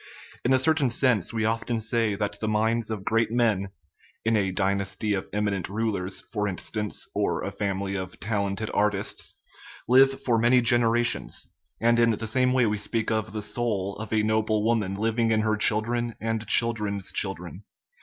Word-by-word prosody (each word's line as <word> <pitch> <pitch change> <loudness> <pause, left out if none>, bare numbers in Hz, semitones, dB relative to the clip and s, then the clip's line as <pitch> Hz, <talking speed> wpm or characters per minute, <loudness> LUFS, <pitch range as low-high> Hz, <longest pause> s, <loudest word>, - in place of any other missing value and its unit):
In 125 - +1
a 130 - +6
cer 130 +5 +3
tain 145 -5 +1
sense 120 -5 +2
we 110 -2 -1
often 115 +1 -1
say 110 -1 0
that 100 0 -3
the 110 - -2
minds 110 +1 +1
of 105 -4 -5
great 115 0 +1
men 110 -5 +1 0.6
(in 115 0 +2
a 100 -3 +1
dynasty 100 +1 -1
of 95 - -3
eminent 100 -4 -1
rulers, 100 -3 -2
for 105 -2 0
instance, 105 +2 -3
or - - -1
a 100 - -3
fam 100 -1 -2
ily 100 0 -3
of 95 -2 -5
talented 100 0 -2
artists) 105 -1 -1 0.5
live 135 +2 +4
for 115 -3 +2
many 120 +2 +5
generations; 120 0 +1 0.3
and 120 +1 +3
in 115 0 +4
the 110 0 -1
same 125 +3 +1
way 130 -1 +3
we 105 -1 0
speak 110 +1 -2
of 110 0 -1
the 105 -1 -4
"soul" 100 -4 -2
of 110 0 -7
a 110 -1 +2
noble 110 0 +1
woman 110 -4 0
living 115 +2 0
in 110 -1 +2
her 110 0 +1
children 115 +2 0
and 115 0 -3
children's 105 -4 +2
children. 95 -1 -3
110 Hz, 180 wpm, -26 LUFS, 100-115 Hz, 0.6 s, a